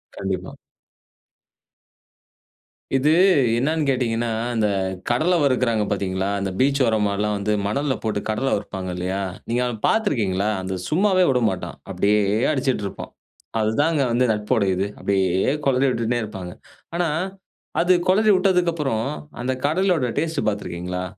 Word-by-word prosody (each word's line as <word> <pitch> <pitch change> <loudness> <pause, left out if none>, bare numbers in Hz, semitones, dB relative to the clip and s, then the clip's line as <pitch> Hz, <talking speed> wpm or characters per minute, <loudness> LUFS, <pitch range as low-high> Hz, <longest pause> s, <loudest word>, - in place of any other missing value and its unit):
கண்டிப்பா. 95 -1 -4 2.4
இது 135 +3 +3 0.5
என்னன்னு 150 +3 0
கேட்டீங்கன்னா, 120 -3 0 0.2
அந்த 110 -3 +1 0.4
கடல 160 +9 +2
வறுக்கிறாங்க 125 -5 +2
பார்த்தீங்களா? 95 -1 -1
அந்த 100 -1 -2
பீச் 140 +1 +3
ஓரமாலாம் 105 -2 +1
வந்து 105 +1 -1
மணல்ல 135 +6 0
போட்டு 110 -2 -1
கடலை 120 +5 0
வறுப்பாங்க 95 -2 -5
இல்லயா! 95 +2 -2 0.3
நீங்க 120 +2 +1
அத 125 - -2
பார்த்து 220 -1 +2
இருக்கீங்களா? 100 -5 0
அந்த 95 0 -3
சும்மாவே 185 +2 +3
விடமாட்டான். 110 -7 -1
அப்பிடியே 105 +1 +2 0.3
அடிச்சிட்டு 130 -7 0
இருப்பான். - - -8 0.5
அதுதான் 145 +10 +1
வந்து 125 +2 +3
நட்போட 105 +1 0
இது. 95 +2 -1
அப்பிடியே 95 +2 +1
குளறி 135 0 +3
விட்டுட்ன்னே 120 -1 0
இருப்பாங்க. 95 -4 -7 0.4
ஆனா, 175 0 +1 0.7
அது 180 +1 +4
குளறி 210 +3 +4
விட்டதுக்கு 180 -2 +2
அப்புறம் 135 -9 -1 0.4
அந்த 130 +1 -1
கடலையோட 170 -3 +2
டேஸ்ட் 160 +1 -1
பார்த்துருக்கீங்களா? 90 -3 -3
115 Hz, 125 wpm, -22 LUFS, 100-145 Hz, 2.4 s, அது